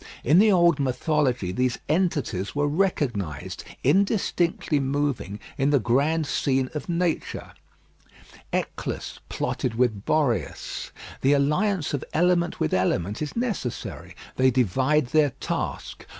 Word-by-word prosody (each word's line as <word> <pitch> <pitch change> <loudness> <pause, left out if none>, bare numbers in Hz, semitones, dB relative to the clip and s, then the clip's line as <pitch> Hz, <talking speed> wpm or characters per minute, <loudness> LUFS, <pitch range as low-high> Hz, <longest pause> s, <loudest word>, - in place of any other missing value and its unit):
In 155 +8 +5
the 215 +1 +6
old 170 -4 +4
mythology 130 - 0
these 125 +5 0
entities 150 - 0
were 145 0 +1
recognised, 135 - -1 0.2
indistinctly 180 -6 +1
moving, 135 -7 -1 0.2
in 135 +1 +3
the 145 - +4
grand 145 +8 +1
scene 135 -2 0
of 150 +3 -5
nature. 170 -1 -2 1.0
Eolus - - -3
plotted 120 -3 -2
with 115 -4 +1
Boreas. 120 - -1 0.3
The 135 +2 +4
alliance 150 +5 +1
of 140 - -2
element 170 +1 +2
with 75 - 0
element 95 - 0
is 150 - -4
necessary; 230 - -4 0.2
they 130 0 +5
divide 130 +5 +2
their 150 -3 +3
task. - - -4
145 Hz, 120 wpm, -25 LUFS, 125-165 Hz, 1.0 s, the